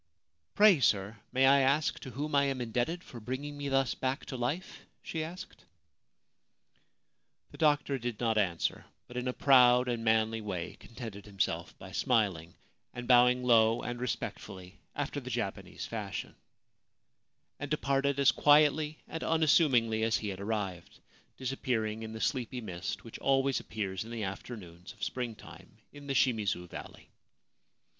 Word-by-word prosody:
{Pray, 205 -6 +7
sir, 105 -3 +2 0.2
may 130 +1 +3
I 140 +1 +6
ask 140 +3 +2
to 130 - -8
whom 145 +5 -4
I 140 0 +4
am 135 -2 -1
indebted 125 +9 -2
for 120 - -10
bringing 130 +6 -5
me 145 -1 -4
thus 135 -2 +2
back 130 +2 -2
to 130 - -6
life? 135 +10 -4
' - - -46
she 160 -1 -3
asked. 175 +4 -9 1.9
The - - -13
doctor 145 -3 +2
did 120 -3 -4
not 115 -2 +1
answer, 90 -6 0 0.2
but 125 - -12
in 125 +1 -2
a - - +1
proud 125 -2 +5
and 120 -2 -2
manly 110 0 +2
way 95 -5 -4
contented 110 -4 -9
himself 85 -4 -2
by 95 - -11
smiling, 100 - 0 0.4
and 125 0 -6
bowing 125 0 +5
low 115 -2 +4
and 120 0 -4
respectfully 95 -6 -5 0.2
after 145 0 -2
the 130 -2 -8
Japanese 115 -5 -4
fashion; - - -5 1.3
and 145 - -5
departed 140 -1 0
as 140 0 +6
quietly 150 +1 +4
and 160 - -5
unassumingly 145 -8 +3
as 110 0 +2
he 105 - -4
had 95 -1 -6
arrived, 100 -4 -4 0.4
disappearing 120 -4 -2
in 110 0 -6
the 110 - -6
sleepy 125 -1 -1
mist 90 -5 -5
which 115 - -9
always 135 0 +2
appears 95 -3 -4
in 115 - -11
the 115 -2 -4
afternoons 95 -3 -7
of - - -12
spring 120 -3 -3
time 105 - -14 0.2
in 145 -1 -11
the 135 - -1
Shimizu 105 -8 +1
Valley. - - -10
120 Hz, 155 wpm, -31 LUFS, 110-140 Hz, 1.9 s, Pray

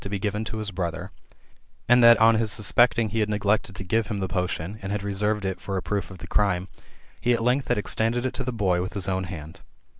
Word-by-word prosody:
1 - - -12
75 100 0 -3
given 105 +1 -1
to 110 - -5
his 105 -2 -4
brother; 90 0 -4 0.8
and 120 0 +6
that 115 -1 +9
on 115 +1 +6
his 110 -1 0
suspecting 115 +2 +3
he 115 +3 -2
had 105 -1 +1
neglected 105 0 0
to 95 - -5
give 110 +4 0
him 105 -3 -3
the 95 - -2
potion, 90 +2 -3
and 95 0 -5
had 105 -1 -2
reserved 105 +1 -1
it 95 -1 -3
for 95 -1 -3
a - - -2
proof 95 0 -2
of 95 - -10
the - - -10
crime, 95 -3 0 0.5
he 120 - +3
at 115 - 0
length 125 +3 +1
had - - +1
extended 115 +4 0
it 130 - -1
to 130 - -4
the 125 - -3
boy 95 -6 +1
with 95 - -4
his 100 -2 -2
own 95 0 -1
hand." 80 -2 -9
105 Hz, 250 wpm, -25 LUFS, 95-110 Hz, 0.8 s, that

